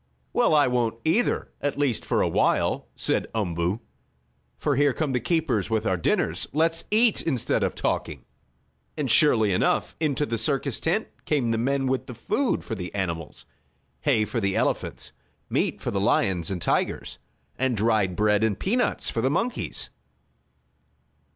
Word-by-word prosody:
"Well, 155 - +3
I 145 - +5
won't 120 -2 0
either 180 +10 +1
at 145 - -1
least 135 -6 +1
for - - +1
a - - +2
while," - - +1
said - - 0
Umboo. 90 0 -1 0.8
"For 145 -2 0
here 145 0 +3
come 155 -1 -1
the 125 - +1
keepers 130 - 0
with 110 -1 0
our 95 - +2
dinners. 85 - 0
Let's 165 +2 +1
eat 220 +1 +4
instead 135 -8 0
of - - 0
talking." - - -2 0.7
And 140 -6 0
surely 110 - +5
enough, - - +1
into 150 -2 0
the 115 -5 -3
circus 135 +1 -1
tent 195 +7 0 0.2
came 135 -7 +1
the 115 - 0
men 135 +3 0
with 130 0 -1
the 125 - -8
food 255 - -1
for - - -5
the 90 -4 -5
animals 85 -5 -4 0.5
hay 120 -8 +2
for 105 +3 -2
the 100 -2 0
elephants, - - -1 0.4
meat - - 0
for - - -3
the - - -1
lions 90 -4 +1
and 95 -2 -3
tigers, - - -1 0.4
and 130 -3 0
dried 105 -4 +2
bread 105 +1 +2
and 110 -3 +1
peanuts 245 +6 0
for 115 - -1
the 130 - +2
monkeys. 230 - -2
125 Hz, 165 wpm, -25 LUFS, 105-150 Hz, 0.8 s, I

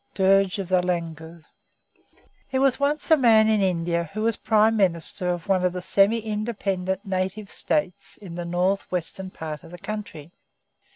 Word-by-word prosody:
Dirge 195 0 +3
of 195 -3 -5
the 185 -1 +3
Langurs. 165 -2 -4 1.0
There 260 -1 0
was 270 -1 +2
once 295 +3 0
a - - +9
man 225 -6 +5
in 215 -2 +3
India 170 -3 0
who 215 - -2
was 225 -1 +1
Prime 220 +1 +3
Minister 180 -2 0
of 175 -2 -3
one 190 -2 +2
of 180 -1 +1
the 180 - -4
semi 205 +5 +3
independent 200 -3 -3
native 190 +2 -3
States 195 -3 -2
in 190 -5 -10
the 175 0 -4
north 180 +3 -1
western 185 +2 -4
part 155 -3 -7
of 165 - -13
the 175 - -10
country. 175 -7 -7
190 Hz, 170 wpm, -24 LUFS, 175-215 Hz, 1.0 s, a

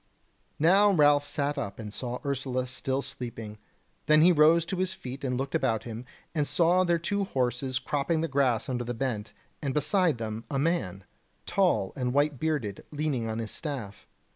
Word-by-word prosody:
Now 195 +6 +5
Ralph 145 -4 +4
sat 145 0 -1
up 100 -7 -5
and 105 -2 -7
saw 125 +1 -4
Ursula 130 -2 -1
still 130 +2 -2
sleeping; 115 -3 -7 0.5
then 155 0 +6
he 180 - +7
rose 160 +1 +5
to 185 - -3
his 185 +1 -1
feet 135 -6 -8
and 125 -2 -1
looked 135 +1 -3
about 125 -8 +1
him, 115 +1 -7 0.3
and 150 -3 0
saw 175 +2 +3
their 175 -1 +2
two 200 +5 -1
horses 130 - -1
cropping 145 +5 -1
the 165 - 0
grass 130 -6 +1
under 125 -2 -2
the 120 0 -4
bent, 115 -4 -3 0.3
and 140 -1 -2
beside 160 - +2
them 110 0 -4
a 140 - -1
man, 135 - -1 0.4
tall 95 - +1
and 125 -1 -2
white 145 -2 +2
bearded, 145 -11 -2
leaning 145 -6 -2
on 110 - -3
his 115 -1 -4
staff. 130 -10 -6
135 Hz, 180 wpm, -28 LUFS, 120-155 Hz, 0.5 s, he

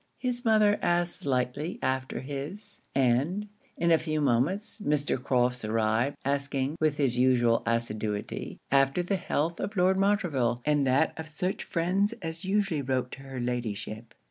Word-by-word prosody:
His 245 -1 -2
mother 215 -3 +4
asked 175 0 +1
slightly 135 +4 -1
after 130 0 -1
his; 145 +10 -6
and, 140 +11 +2 0.3
in 170 0 +2
a 165 - +6
few 155 -1 -2
moments, 150 - 0
Mr. 145 -5 0
Crofts 125 -2 +1
arrived, 110 +4 +1
asking, 140 0 -1
with 155 -2 +1
his 125 -4 +1
usual 120 -2 +4
assiduity, 110 -3 -2
after 135 +5 +3
the 195 +3 0
health 170 -2 -1
of 205 0 -4
Lord 185 +1 +3
Montreville 165 - +1
and 145 -2 +2
that 135 +5 +3
of 160 - -5
such 180 +5 -2
friends 190 +6 0
as 165 -3 -6
usually 195 -5 +1
wrote 130 -1 -1
to 135 - -9
her 135 -1 -7
Ladyship? 115 -2 -4
140 Hz, 150 wpm, -28 LUFS, 125-180 Hz, 0.3 s, a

